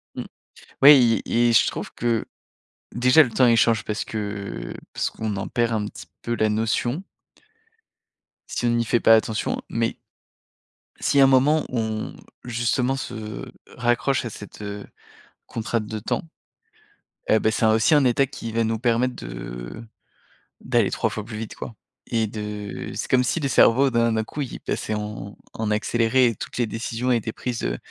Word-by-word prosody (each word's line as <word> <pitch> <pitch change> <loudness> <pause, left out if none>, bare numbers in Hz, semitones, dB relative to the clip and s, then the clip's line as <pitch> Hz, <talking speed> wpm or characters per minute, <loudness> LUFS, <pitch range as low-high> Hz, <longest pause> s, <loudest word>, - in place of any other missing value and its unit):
Mmh. - - -4 0.6
Ouais 145 +1 +10
et 120 0 +2
et - - +2
je - - +5
trouve - - -4
que 115 -1 0 0.7
déjà, 125 +6 +6
le 130 - -1
temps 125 +3 +4
il 115 -1 +5
change 115 -1 +3
parce 105 +1 -3
que 105 -2 -5 0.2
parce - - -1
qu'on 110 -2 -4
en 95 - -4
perd 120 -1 0
un 105 -2 -1
petit - - -10 0.2
peu 120 - -2
la 110 - +2
notion 115 - 0 1.5
si - - -3
on - - +3
n'y 120 0 +1
fait 120 +1 +2
pas 115 - +7
attention, 110 0 -1
mais 115 0 -1 1.0
si 140 - +2
à - - +8
un - - +7
moment 135 +4 +4
on, 110 -3 -2 0.3
justement, 120 +2 0
se 110 -5 -6 0.3
raccroche 120 +3 +1
à - - -3
cette, 105 0 -11
heu, 100 0 -6 0.6
contrainte 115 -1 -2
de 110 +1 -4
temps, 105 - -2 1.1
eh 110 - +4
ben, 110 - +2
c'est 110 - +1
un 110 - +5
aussi 110 +9 +3
un 145 -3 +5
état 125 +2 +3
qui 115 -3 -7
va 115 +1 +1
nous 110 0 -1
permettre 125 +1 +1
de - - -7 0.8
d'aller - - +1
3 - - 0
fois 105 - -5
plus 110 -1 -7
vite, 110 0 -6
quoi 115 - -8 0.3
et 115 -2 0
de 105 -1 -6
c'est - - -3
comme 125 -1 +4
si 125 - 0
le 140 - -1
cerveau 135 +1 +5
d'un 115 0 +2
d'un 110 0 0
coup, 145 +6 -6
il 130 - -5
passait 110 - -3
en 105 -1 -6 0.2
en 110 -1 -2
accéléré 115 +4 +2
et 115 - -1
toutes - - -7
les 120 - +2
décisions 115 +3 -2
étaient 115 -2 0
prises, 120 +1 -4
heu, - - -1
115 Hz, 180 wpm, -23 LUFS, 110-125 Hz, 1.5 s, Ouais